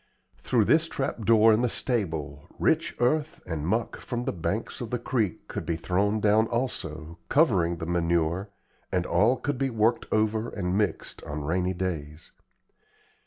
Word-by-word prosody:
Through - - +2
this - - +4
trap - - -3
door 110 -1 +6
in 110 - +2
the 125 - +2
stable 80 - -2
rich - - +1
earth 155 +6 +1
and 80 -3 -3
muck 115 +5 0
from 120 -1 -4
the - - -1
banks 95 +8 -3
of 120 - -4
the 125 - -1
creek 115 -5 -2
could - - -4
be 85 - -1
thrown 100 +6 0
down 105 +2 +3
also, 85 -10 -4
covering 95 - +3
the 80 - -5
manure, 85 +2 0 0.4
and 90 -1 0
all 105 +9 +3
could 145 -1 -3
be 135 -1 +1
worked 115 0 +1
over 110 +1 +1
and 90 -2 -2
mixed 105 0 -2
on 75 0 -4
rainy 90 +4 0
days. 80 -4 -4
100 Hz, 165 wpm, -27 LUFS, 85-115 Hz, 0.4 s, door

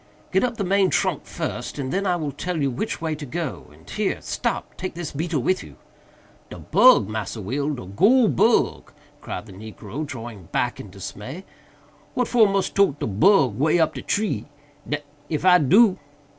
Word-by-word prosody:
"Get 190 - +2
up 240 -2 -1
the 200 - -1
main 195 0 +3
trunk - - 0
first, - - -5
and 135 -2 -3
then 195 +1 0
I 180 - +2
will 155 -4 -3
tell 180 +3 -4
you 140 -2 +1
which 160 - -4
way 160 -1 -1
to 150 0 -7
go—and 150 +1 -6
here—stop! - - -2
take 185 -2 -5
this 170 -3 -5
beetle 155 -2 -2
with 185 +6 +1
you." - - -13 0.7
"De - - -9
bug, 255 - +5
Massa 110 0 -4
Will!—de 135 +3 -3
goole 215 - +4
bug!" 130 - +2 0.3
cried - - -6
the 100 - -12
negro, 110 +6 -7
drawing 115 - -8
back - - -1
in - - -9
dismay—"what 150 - -8
for 225 -4 +4
mus 195 -1 0
tote 195 -8 +2
de - - -2
bug 135 - +3
way 155 +4 +3
up 160 - +2
de - - -6
tree?—d—n 145 -7 -4 0.3
if 155 +2 -2
I 180 -1 +7
do!" 190 - +5
150 Hz, 170 wpm, -23 LUFS, 130-190 Hz, 0.7 s, I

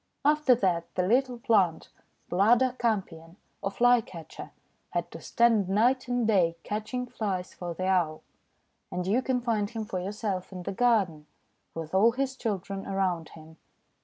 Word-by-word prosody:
After 300 -3 +4
that 175 -6 0
the 180 - +1
little 250 +4 +2
plant, 215 -9 +1 0.4
Bladder 240 +7 +3
Campion 185 -7 -2
— - - -44
or 195 - -1
Fly 245 +3 +4
Catcher 165 -6 -10 0.2
— - - -44
had - - -1
to - - -9
stand 230 -5 +2
night 245 +6 +2
and 245 -1 0
day 175 -6 +2
catching 215 +4 -3
Flies 200 -7 -4
for 175 -1 -6
the 185 - -3
Owl. 175 -5 +1 0.7
And 180 0 -3
you 215 +7 +2
can 255 -1 -1
find 220 -4 0
him 225 -1 -5
for 185 -3 -3
yourself 195 0 -4
in 185 -1 -7
the - - -3
garden, 195 -9 +1 0.5
with 160 0 -6
all 220 +5 +5
his 265 +1 -2
children 195 -5 -4
around 185 -4 -1
him. 160 0 -14
205 Hz, 165 wpm, -28 LUFS, 180-240 Hz, 0.7 s, all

